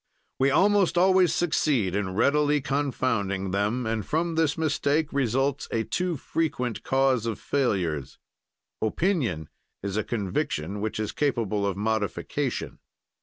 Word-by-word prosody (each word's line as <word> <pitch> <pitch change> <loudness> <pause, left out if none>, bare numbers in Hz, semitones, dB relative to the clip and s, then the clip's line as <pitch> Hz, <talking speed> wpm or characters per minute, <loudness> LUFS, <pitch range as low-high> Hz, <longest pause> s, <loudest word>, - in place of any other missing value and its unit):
"We 135 +1 +4
almost 195 +4 +3
always 185 -1 +5
succeed 140 - +1
in 95 -2 -2
readily 150 +5 +3
confounding 125 -9 -1
them, 105 +6 0
and 110 -1 -1
from 165 - -1
this 160 -2 +1
mistake 155 -1 0
results 135 +1 0
a 115 - 0
too 180 +5 -1
frequent 125 -6 -2
cause 130 -3 +2
of 110 -3 -2
failures. 90 - -1 0.6
"Opinion 110 - 0 0.4
is 100 0 -2
a 110 - +1
conviction 100 -3 -2
which 110 0 -3
is 110 - -2
capable 110 -8 0
of 100 -1 -2
modification. 105 -1 -2
125 Hz, 125 wpm, -26 LUFS, 105-150 Hz, 0.6 s, always